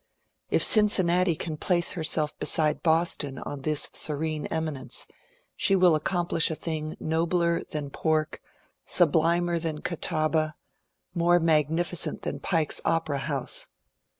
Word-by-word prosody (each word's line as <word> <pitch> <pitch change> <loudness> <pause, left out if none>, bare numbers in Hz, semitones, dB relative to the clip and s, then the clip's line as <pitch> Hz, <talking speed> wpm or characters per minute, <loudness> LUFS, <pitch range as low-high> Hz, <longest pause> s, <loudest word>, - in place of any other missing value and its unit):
If - - +2
Cincinnati 185 -5 +3
can 155 0 -4
place 175 +1 +1
herself 155 -2 -1
beside 155 -2 +1
Boston 160 -4 +1
on 145 +1 -7
this 150 +1 0
serene 155 0 -1
eminence, 160 -4 -4 0.5
she 195 - +2
will 180 -3 +5
aocompli£ih 175 -1 +1
a 160 - -2
thing 155 -1 -5
nobler 170 +1 0
than 145 -2 -5
pork, 155 0 -1 0.4
sublimer 170 +1 +2
than 155 -2 -4
Catawba, 155 -2 0 0.6
more 175 +1 +3
magnificent 160 +1 +1
than 140 - -4
Pike's 160 -1 +1
Opera 160 -4 0
House. - - -3
160 Hz, 120 wpm, -26 LUFS, 155-170 Hz, 0.6 s, will